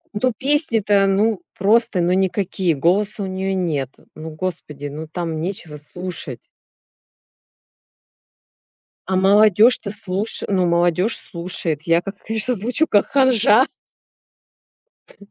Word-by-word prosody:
Ну 250 +5 +1
песни-то, 225 -9 +1
ну 205 +1 +1 0.2
просто 215 0 +2
ну 175 +1 +1
никакие, 190 -2 0
голоса 200 +8 0
у - - -3
неё 190 0 -3
нет. 155 -8 -2 0.2
Ну 160 +1 -8
господи, 155 -3 -6
ну 150 +3 -6
там 165 -3 -4
нечего 170 -4 -6
слушать. 155 -4 -7 2.7
А 190 - +2
молодёжь-то 210 +3 +4
слуш 205 0 -2
ну 185 -3 +1
молодёжь 175 +4 +2
слушает. 170 -4 -3
Я, 170 +1 +2
как 195 +1 -7
конечно, 225 +3 -1
звучу 245 +10 -1
как 205 - +2
ханжа. 260 -3 +4 1.4
Т - - -20
190 Hz, 115 wpm, -20 LUFS, 170-215 Hz, 2.7 s, молодёжь-то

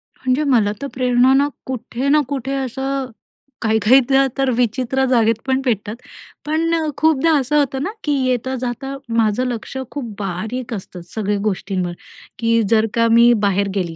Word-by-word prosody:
म्हणजे 260 +3 0
मला 230 -7 +3
तर 280 - -3
प्रेरणा 250 0 +3
ना, 280 +1 +4 0.2
कुठे 255 +1 -4
ना 300 +1 +5
कुठे 270 -1 -3
असं 265 0 -3 0.5
काही-काहीदा 250 +5 +4
तर 270 -1 +1
विचित्र 255 +2 0
जागेत 230 -3 +3
पण 265 0 +1
पेटतात 215 -2 -1 0.5
पण, 325 +2 0 0.2
खूपदा 320 0 +3
असं 290 +3 0
होतं 270 -1 -1
ना 390 - -2
की 295 - 0
येता-जाता 255 +1 -2 0.2
माझं 225 +3 +2
लक्ष 245 +2 -5
खूप 240 -7 -5
बारीक 220 +6 -4
असतं, 185 -3 -7
सगळ्या 205 -1 0
गोष्टींवर. 185 -3 -2 0.5
की 230 0 +2
जर 225 -1 +4
का 230 0 +3
मी 235 +1 +6 0.2
बाहेर 200 +1 +1
गेली. 170 -4 -2
250 Hz, 150 wpm, -19 LUFS, 220-270 Hz, 0.5 s, मी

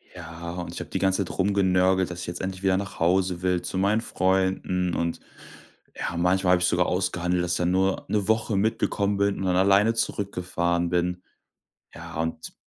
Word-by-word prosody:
Ja, 85 0 -8
und 90 0 -6
ich - - -6
habe - - -8
die - - -2
ganze 95 +1 +2
Zeit 90 - -8
rumgenörgelt, 95 -1 +2
dass 90 0 -6
ich - - -6
jetzt 85 - -5
endlich 95 0 -5
wieder 95 -1 +3
nach 100 0 -6
Hause 90 +1 +1
will 90 -1 +1
zu - - -4
meinen 100 +4 +2
Freunden 95 -3 0
und, 85 0 -2 0.8
ja, 85 - -4
manchmal 90 +1 +2
habe 90 - +2
ich 90 - +3
sogar 90 0 +2
ausgehandelt, 90 -1 0
dass 90 - -2
ich - - 0
dann 90 0 +1
nur 95 +1 +1
'ne 105 -3 0
Woche 110 -1 +1
mitgekommen 100 -1 0
bin 100 0 +1
und 95 - -3
dann 90 -1 +1
alleine 100 +4 +4
zurückgefahren 90 -5 -1
bin. 90 +1 -1 0.7
Ja, - - -10
und 80 0 -4
95 Hz, 195 wpm, -25 LUFS, 90-95 Hz, 0.8 s, alleine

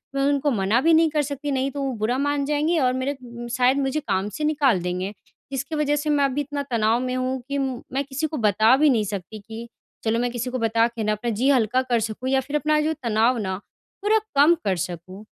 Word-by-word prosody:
मैं 275 - +1
उनको 285 +1 +2
मना 215 +2 +2
भी 330 +2 +4
नहीं 320 0 +5
कर 300 -1 +1
सकती 285 0 -4
नहीं 270 0 0
तो 280 - -5
वो 270 -2 -1
बुरा 245 +4 +1
मान 285 0 0
जाएँगे 300 +4 +1
और 255 -2 +2
मेरे 260 +2 -1
उम, 240 0 -8
शायद 250 +2 +2
मुझे 275 +2 0
काम 200 -5 -1
से 305 - -3
निकाल 285 - +2
देंगे। 180 +3 -3 0.4
जिसकी 275 +3 -3
वज़ह 295 -1 +1
से 295 +1 -2
मैं 285 -1 +3
अभी 275 +1 -1
इतना 285 0 -4
तनाव 225 +1 +2
में 255 0 -2
हूँ 255 +1 -1
कि 280 - -1
म 265 -3 -2
मैं 275 +1 0
किसी 280 +3 -2
को 310 - -5
बता 220 +2 +4
भी 300 +1 +4
नहीं 230 -5 +2
सकती 200 +2 -6
कि 225 +3 -9 0.4
चलो 225 +1 +1
मैं 245 0 0
किसी 245 +1 -3
को 255 - -3
बता 230 +1 +2
के 230 -2 -5
ना 215 - +1
अपना 215 +3 -2
जी 270 - +4
हल्का 255 -1 +3
कर 245 -3 0
सकूँ 220 +4 -3
या 270 0 +3
फिर 285 +3 -6
अपना 300 0 +2
जो 315 +1 0
तनाव 230 +2 +2
ना 190 -3 -2 0.5
थोड़ा 430 +2 +4 0.2
कम 295 +5 +6
कर 195 - +2
सकूँ। 185 +4 -9
255 Hz, 245 wpm, -23 LUFS, 225-285 Hz, 0.5 s, कम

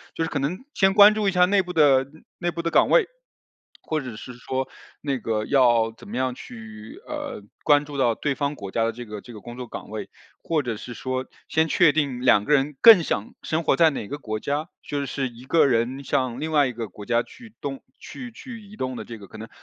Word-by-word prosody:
就 165 - -1
是 160 - -2
可 145 - -1
能 160 - -3
先 195 0 +3
关 210 0 +9
注 215 -2 0
一 - - 0
下 180 -1 +5
内 195 +2 +3
部 180 -1 -7
的 140 -5 +5
嗯， 155 +4 -20
内 175 -1 0
部 170 - -4
的 165 - -1
岗 - - +4
位。 - - +5 0.8
或 155 -1 -1
者 125 -5 -7
是 115 +3 -9
说， 130 +2 -3 0.3
那 140 -2 -1
个 110 -2 -2
要 120 -4 +4
怎 - - -14
么 - - -7
样 130 0 -1
去 110 -3 -11
呃， - - -5 0.2
关 145 -1 +5
注 145 -1 -8
到 120 -4 +3
对 140 +4 -2
方 140 +1 -1
国 100 -9 -8
家 115 +4 0
的 115 - +1
这 120 +2 -9
个 105 -2 -7
这 120 - -12
个 105 - -10
工 120 +3 -9
作 125 -1 -6
岗 - - -8
位， 110 0 -5 0.4
或 160 -2 +1
者 120 -5 -4
是 120 +2 -8
说， 130 +2 -3 0.2
先 160 0 +2
确 150 - +5
定 140 -5 -1
两 105 -5 +4
个 150 - +2
人 140 0 +1
更 225 -6 +10
想 105 -9 -3
生 160 +1 -1
活 - - +3
在 165 -1 +5
哪 135 -8 -5
个 145 +5 -6
国 110 -5 -4
家， 145 +7 -2
就 140 -1 -3
是 135 -1 -2
一 120 +1 -14
个 160 +5 +4
人 125 +1 0
向 130 -2 -1
另 160 +2 -3
外 145 -3 +4
一 125 - -4
个 115 -1 -5
国 100 +2 -12
家 120 -1 +2
去 230 - -15
动 140 -3 -5 0.2
去 250 -2 -9
去 230 0 -10
移 205 0 -14
动 130 0 -3
的 - - -5
这 115 - -9
个 100 - -12
可 110 - -12
能 110 +1 -8
135 Hz, 270 characters per minute, -24 LUFS, 120-160 Hz, 0.8 s, 更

